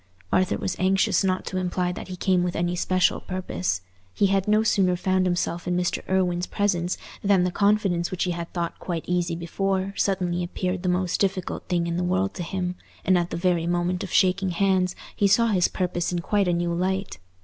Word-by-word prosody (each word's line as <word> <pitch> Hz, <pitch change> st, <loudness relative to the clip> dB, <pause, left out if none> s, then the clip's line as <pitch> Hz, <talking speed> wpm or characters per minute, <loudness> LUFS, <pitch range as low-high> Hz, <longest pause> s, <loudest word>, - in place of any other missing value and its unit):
Arthur 185 Hz, +2 st, +2 dB
was 190 Hz, -, -2 dB
anxious 190 Hz, +2 st, +2 dB
not 185 Hz, -1 st, 0 dB
to 185 Hz, -, -3 dB
imply 180 Hz, 0 st, -1 dB
that 180 Hz, -, -7 dB
he 185 Hz, -, -6 dB
came 180 Hz, 0 st, +2 dB
with 175 Hz, 0 st, -1 dB
any 175 Hz, +1 st, 0 dB
special 185 Hz, +1 st, +2 dB
purpose. 90 Hz, -, -3 dB, 0.3 s
He 205 Hz, -, +3 dB
had 195 Hz, 0 st, +1 dB
no 215 Hz, +1 st, +4 dB
sooner 190 Hz, -4 st, +3 dB
found 185 Hz, +1 st, +1 dB
himself 175 Hz, -1 st, -1 dB
in 180 Hz, 0 st, +1 dB
Mr. 180 Hz, 0 st, -1 dB
Irwine's 180 Hz, -2 st, +1 dB
presence 180 Hz, -3 st, 0 dB, 0.3 s
than 195 Hz, -3 st, +4 dB
the 180 Hz, -, 0 dB
confidence 200 Hz, -3 st, +2 dB
which 185 Hz, -, -2 dB
he 180 Hz, -, 0 dB
had 170 Hz, -1 st, -5 dB
thought 170 Hz, -1 st, -3 dB
quite 170 Hz, -3 st, -4 dB
easy 175 Hz, -1 st, 0 dB
before, 190 Hz, +3 st, -1 dB
suddenly 180 Hz, -3 st, 0 dB
appeared 180 Hz, +1 st, -2 dB
the 185 Hz, -, 0 dB
most 180 Hz, 0 st, 0 dB
difficult 190 Hz, -2 st, -1 dB
thing 175 Hz, -2 st, 0 dB
in 170 Hz, 0 st, -2 dB
the 180 Hz, -, 0 dB
world 185 Hz, +2 st, 0 dB
to 185 Hz, -, -6 dB
him, 180 Hz, +1 st, -3 dB, 0.3 s
and 185 Hz, -, +4 dB
at 175 Hz, -1 st, +1 dB
the -, -, -3 dB
very 170 Hz, -1 st, +1 dB
moment 175 Hz, +1 st, 0 dB
of 195 Hz, -, -6 dB
shaking 190 Hz, 0 st, +3 dB
hands 185 Hz, 0 st, +1 dB, 0.2 s
he 205 Hz, -, +3 dB
saw 230 Hz, +4 st, +4 dB
his 185 Hz, -4 st, +3 dB
purpose 175 Hz, -2 st, -2 dB
in 175 Hz, -, -1 dB
quite 200 Hz, +3 st, +1 dB
a 175 Hz, -, +2 dB
new 170 Hz, 0 st, 0 dB
light. 190 Hz, +3 st, -2 dB
180 Hz, 210 wpm, -25 LUFS, 175-190 Hz, 0.3 s, no